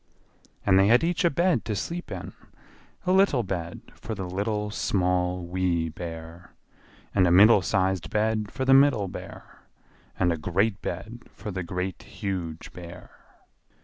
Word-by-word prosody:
And 95 - +5
they 95 - +5
had 120 +6 +5
each 175 +3 0
a 170 - +5
bed 170 - +1
to 105 - -2
sleep 170 - -4
in: - - -6 0.7
a 180 - +2
little 190 -10 +4
bed 85 -4 -4
for 110 - -6
the 95 -3 -5
Little, 105 +3 -2
Small, 90 -2 0
Wee 85 -2 0
Bear; 80 +1 -9 0.6
and 95 -3 +4
a - - +3
middle 100 +3 +7
sized 95 -1 0
bed 110 -1 0
for 130 -1 -3
the 135 - +5
Middle 135 -7 +5
Bear; 90 - -10 0.6
and 90 -2 +2
a - - -3
great 95 +6 0
bed 110 +7 -6
for 105 - -6
the 95 0 -3
Great, 90 +1 -4
Huge 90 -5 -5
Bear. 90 0 -11
95 Hz, 155 wpm, -26 LUFS, 90-110 Hz, 0.7 s, middle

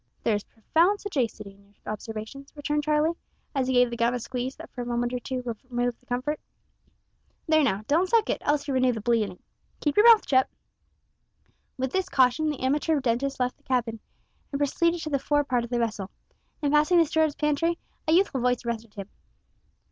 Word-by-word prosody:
"There 225 - +2
is 205 -1 -1
profound 335 - +1
sagacity 235 - -3
in 200 +1 -22
your 200 +1 -28 0.2
observations," 220 +6 -8
returned 295 0 -1
Charlie, 305 +2 +2 0.4
as 265 -3 0
he 260 - +1
gave 245 -1 +4
the - - -3
gum 235 +1 +1
a - - -2
squeeze 250 +3 -4
that - - -12
for 250 - -6
a - - -4
moment 240 0 -1
or 250 - -1
two 255 0 -4 0.3
removed 245 -1 -1
the 250 - -31
comfort; 260 +5 -2 1.1
"there, 315 -1 +4
now, 210 -6 0
don't 340 +6 +2
suck 460 -2 +3
it, - - -1
else 290 0 0
you'll 275 - -1
renew 255 -1 +3
the 225 - -4
bleeding. 215 -4 0 0.4
Keep 295 +3 -1
your 425 +3 +7
mouth 445 - +4
shut." 260 -1 +3 1.3
With 260 0 -2
this 375 +2 -1
caution 260 +3 +3
the 295 - -4
amateur 295 +4 +1
dentist 265 +2 -1
left 250 0 -1
the - - -32
cabin, 240 -4 -1 0.5
and 280 - -1
proceeded 335 +4 +1
to 310 - -5
the 280 - +1
fore 290 +2 +1
part 250 -4 0
of 235 - -7
the 240 - -1
vessel. 215 -5 -2 0.5
In 285 - +2
passing 305 +4 +4
the 335 - +6
steward's 315 -1 +1
pantry 300 +3 +1 0.3
a 315 - +3
youthful 345 -7 +3
voice 245 -1 0
arrested 230 -2 -4
him. 200 -2 -6
260 Hz, 200 wpm, -26 LUFS, 235-300 Hz, 1.3 s, your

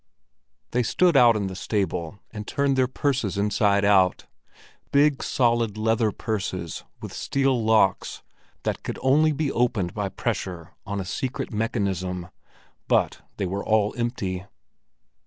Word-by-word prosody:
They 125 - +2
stood 175 +7 +2
out 120 -4 +7
in 105 -2 -1
the 95 -1 -5
stable, 90 -3 -2
and 105 -1 -7
turned 140 -1 +1
their 130 -1 +3
purses 130 -6 -1
inside 100 0 +2
out 95 -3 +3 0.7
—big, 145 0 +3
solid, 115 -4 +1
leather 110 0 +2
purses 95 -6 -4 0.2
with - - -7
steel 135 -4 0
locks 110 -4 +2 0.4
that - - -2
could - - -5
only 150 +4 +4
be 150 -1 -1
opened 110 -7 0
by 100 -2 -2
pressure 95 -5 -4 0.2
on 100 0 -2
a 95 - -4
secret 125 +6 -4
mechanism; 95 -5 -2 0.6
but - - +1 0.2
they - - -1
were 95 +2 -3 0.3
empty. 100 -6 -3
110 Hz, 135 wpm, -25 LUFS, 95-125 Hz, 0.7 s, out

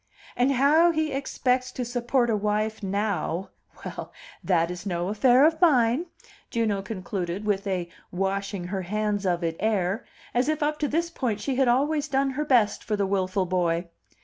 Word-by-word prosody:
"And 255 +3 +2
how 295 +6 +5
he 315 -2 0
expects 255 -2 0
to 250 - -3
support 240 0 +1
a - - +2
wife 210 +1 -1
now 195 -3 -2 0.3
well, - - -6 0.3
that 170 -2 +2
is 180 -1 -7
no 175 -2 -2
affair 245 +6 +5
of 320 +1 +2
mine," 270 -1 +4 0.4
Juno 215 -4 0
concluded, 190 -1 -4
with 205 -1 0
a 180 -3 -1 0.2
washing 195 +1 -2
her 190 0 -2
hands 205 +1 -1
of 175 -1 0
it 165 -1 -1
air, 205 0 0 0.3
as 245 +4 +2
if 310 -1 0
up 300 +1 0
to 295 - +1
this 335 +4 -1
point 235 -10 -2
she 250 +5 -2
had 265 -1 +3
always 290 +5 +2
done 270 -1 +1
her 295 +3 -2
best 235 -7 +3
for 215 - -1
the 200 -1 0
wilful 190 -1 0
boy. 175 -1 0
215 Hz, 175 wpm, -26 LUFS, 190-265 Hz, 0.4 s, how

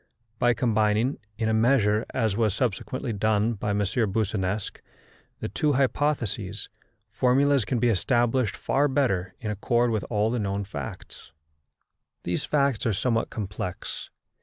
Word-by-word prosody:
By 120 -1 +3
combining, 110 +2 +1 0.2
in 110 -1 0
a 110 - +2
measure, 110 -2 +3
as 110 -6 0
was 110 -3 +1
subsequently 125 +2 -2
done 110 +2 +1
by 105 -1 -3
M. 100 - +1
Boussinesq, 100 -2 -1 0.6
the - - -2
two 150 -1 +1
hypotheses, 125 -7 -1 0.4
formulas 130 +2 +3
can 125 - -1
be 120 +1 +2
established 120 +1 +1
far 145 +2 +1
better 100 -10 0
in 110 -3 -3
accord 120 +3 +1
with 110 -3 -1
all 110 0 +1
the 120 - -1
known 100 -1 -1
facts. 75 -3 -8 0.9
These 90 - -2
facts 140 -5 +1
are 110 - +2
somewhat 115 +3 0
complex. 95 -3 -5
110 Hz, 135 wpm, -26 LUFS, 105-125 Hz, 0.9 s, By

